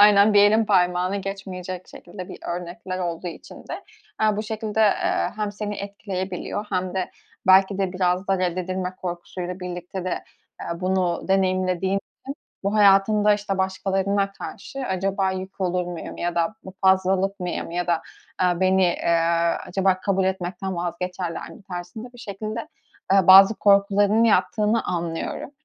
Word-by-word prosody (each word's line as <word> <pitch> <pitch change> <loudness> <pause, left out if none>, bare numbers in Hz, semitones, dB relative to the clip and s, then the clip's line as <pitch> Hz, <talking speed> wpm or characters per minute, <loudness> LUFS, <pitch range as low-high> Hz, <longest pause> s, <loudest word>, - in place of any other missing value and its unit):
aynen, 205 0 +7
bir 205 - +7
elin 215 +2 +5
parmağını 180 -1 +2
geçmeyecek 185 -2 -6
şekilde 185 -3 -10
bir - - -9
örnekler 180 +2 -5
olduğu 175 0 -3
için 165 - -10
de, - - -6 0.4
eee, 215 -1 +3
bu 215 - -1
şekilde, 220 0 -3
eee, 355 - +2
hem 210 -1 -2
seni 210 0 -4
etkileyebiliyor 200 0 -4
hem 185 -1 -1
de 185 -1 -2 0.4
belki 190 +1 +5
de, 190 -2 0
biraz 185 +1 0
da 195 - +2
reddedilme 185 +1 -2
korkusuyla 180 +1 -5
birlikte 180 +1 -6
de, 185 - -3 0.4
eee, 170 +1 -5
bunu 185 -1 0
deneyimlediğin 185 -1 +1
için, 195 - -2 0.6
bu 200 +2 -1
hayatında, 210 +1 +5
işte, 205 -2 -3
"Başkalarına 195 +1 0
karşı 235 +6 -8
acaba 190 0 0
yük 190 +1 -6
olur 180 -1 0
muyum?" 175 -2 -6
ya 175 0 -2
da 170 +5 0
bu 190 - -9
"Fazlalık 190 +1 +2
mıyım?" 180 -2 -3
ya 175 +1 -2
da, 165 -2 +1 0.4
aaa, 180 -1 +1
"Beni, 185 -1 +3
aaa, 170 0 +2
acaba 190 0 +1
kabul 195 -1 +1
etmekten 190 0 -3
vazgeçerler 175 0 -4
mi?" - - -13
tarzında 185 +7 -8
bir 245 - -16
şekilde, 215 +2 -5 0.4
ııı, 195 -3 +5
bazı 195 +3 +9
korkularının 200 +2 +4
yattığını 215 +1 +2
anlıyorum. 170 +6 -3
190 Hz, 150 wpm, -23 LUFS, 180-200 Hz, 0.6 s, bazı